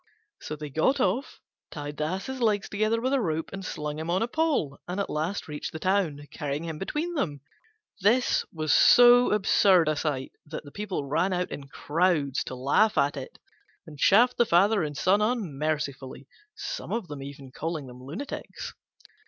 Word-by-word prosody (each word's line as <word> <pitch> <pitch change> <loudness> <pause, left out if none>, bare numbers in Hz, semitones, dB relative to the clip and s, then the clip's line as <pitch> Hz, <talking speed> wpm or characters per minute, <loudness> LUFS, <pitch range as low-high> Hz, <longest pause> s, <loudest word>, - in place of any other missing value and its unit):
So 155 - -5
they 150 -1 -7
got 260 - +2
off, 240 +6 -1 0.3
tied 145 -1 -7
the 150 - -1
Ass's 195 +10 -4
legs 210 -4 +2
together 215 +2 0
with 260 +3 -1
a 275 - +2
rope 160 -5 -2
and 195 0 -6
slung 150 -3 -4
him 160 +1 -4
on 185 +5 +1
a - - -1
pole, 270 - 0
and 180 +3 -3
at 200 - -2
last 160 +6 -2
reached 150 -1 -5
the - - -4
town, 170 -5 0
carrying 145 +1 -3
him 160 -2 -5
between 310 - -3
them. 150 - -2 0.6
This 230 +6 +3
was 155 -3 0
so 245 0 +7
absurd 195 -4 +4
a 155 - +2
sight 145 -3 -2
that 155 +1 -7
the 145 - -12
people 190 -4 -4
ran 165 +7 +1
out 180 0 -2
in 140 -1 -7
crowds 150 -2 0
to 130 - -6
laugh 140 +12 +2
at 140 +1 +2
it, 135 -2 -8 0.5
and 150 -3 -12
chaffed 240 - +5
the 240 - +4
Father 200 +5 +4
and 150 -3 -3
Son 200 +3 +3
unmercifully, 150 - -2 0.3
some - - -5 0.3
even 140 -1 -9
calling 160 0 -4
them 125 0 -12
lunatics. 165 - -7
165 Hz, 175 wpm, -27 LUFS, 145-210 Hz, 0.6 s, so